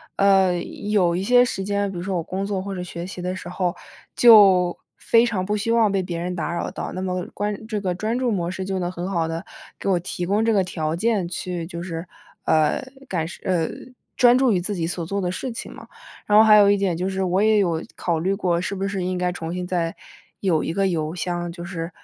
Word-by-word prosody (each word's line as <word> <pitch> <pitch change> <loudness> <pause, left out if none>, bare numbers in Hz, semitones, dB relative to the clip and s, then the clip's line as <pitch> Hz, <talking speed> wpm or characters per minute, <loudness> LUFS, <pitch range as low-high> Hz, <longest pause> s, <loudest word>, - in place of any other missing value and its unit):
呃， 195 -2 +4
有 200 -2 0
一 175 - -1
些 245 +4 +5
时 240 -5 -2
间， 200 0 -1
比 185 - -7
如 175 - -4
说 190 0 -2
我 170 - -1
工 190 +4 -3
作 200 -2 -2
或 195 +1 -5
者 180 - -4
学 175 -1 -6
习 185 -1 -7
的 180 +1 -3
时 180 - -8
候， 180 -1 -1 0.4
就， 195 -7 +7 0.2
非 230 +1 +4
常 205 -6 -1
不 210 +2 -1
希 225 +3 -1
望 230 -3 +4
被 195 -1 +1
别 175 -2 -4
人 180 +1 -3
打 170 -1 -3
扰 170 - -3
到。 - - -5
那 185 - -4
么 185 -1 -2
关 210 +1 -3
这 215 -2 -3
个 185 -2 -1
专 215 +6 -2
注 250 -2 0
模 175 -5 -1
式 190 +1 -4
就 190 0 -2
能 175 -1 -1
很 180 +1 -5
好 165 -3 0
地， 165 +3 -5 0.3
给 - - -3
我 185 -2 +3
提 175 0 -4
供 205 +4 +1
这 225 - +3
个 195 -2 +3
条 160 -3 -2
件 205 -1 0
去 175 -1 -4
就 170 -1 -6
是， 165 -1 -5 0.4
呃， 155 - +2 0.3
感 170 -7 -1
受 175 +1 -9
呃， 175 -4 +1 0.5
专 245 0 +6
注 260 -2 +3
于 190 - +2
自 200 +4 -3
己 170 -3 -1
所 170 0 -3
做 200 +4 -2
的 180 -1 -1
事 255 - -4
情 - - -7
嘛。 - - -12 0.4
然 210 - +4
后 215 - +9
还 215 -1 +7
有 205 -1 +6
一 205 - +5
点 195 -4 0
就 180 +2 -1
是， 190 0 -1
我 185 +1 +1
也 215 0 +4
有 170 -5 +1
考 170 -2 -1
虑 190 +4 0
过， 180 -4 0
是 195 +3 -3
不 195 0 -2
是 195 -1 -2
应 185 0 -1
该 180 0 0
重 165 -1 -5
新 180 0 -3
再， 175 -2 -1 0.5
有 175 -6 +2
一 160 - -3
个 195 +2 +1
邮 160 -2 -2
箱， 175 0 -3
就 170 0 -8
是， 170 -2 -5
185 Hz, 270 characters per minute, -23 LUFS, 175-200 Hz, 0.5 s, 后